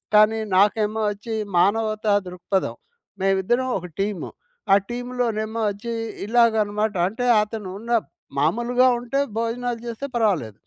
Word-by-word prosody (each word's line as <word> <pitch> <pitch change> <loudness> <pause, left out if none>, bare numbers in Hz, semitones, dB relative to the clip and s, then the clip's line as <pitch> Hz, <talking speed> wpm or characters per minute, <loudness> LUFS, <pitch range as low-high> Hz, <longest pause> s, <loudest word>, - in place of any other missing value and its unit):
కానీ 215 +1 +5 0.2
నాకేమో 210 +2 +3
ఒచ్చి 215 +2 -5 0.2
మానవతా 215 +3 +2
దృక్పథం. 180 +2 -2 0.5
మేమిద్దరం 195 +7 +1
ఒక 180 - -8
టీము. 200 -4 -2 0.4
ఆ - - +8
టీమ్‌లోనేమో 240 -2 -2
ఒచ్చి 220 +4 -6 0.3
ఇలాగనమాట. 220 -2 +2
అంటే 230 +4 -3 0.2
అతనున్న 210 +1 -6 0.5
మామూలుగా 240 - +3
ఉంటే 245 +3 -2 0.2
భోజనాలు 235 +1 -2
జేస్తే 235 +4 -4
పర్వాలేదు. 165 - 0
220 Hz, 105 wpm, -23 LUFS, 200-235 Hz, 0.5 s, ఆ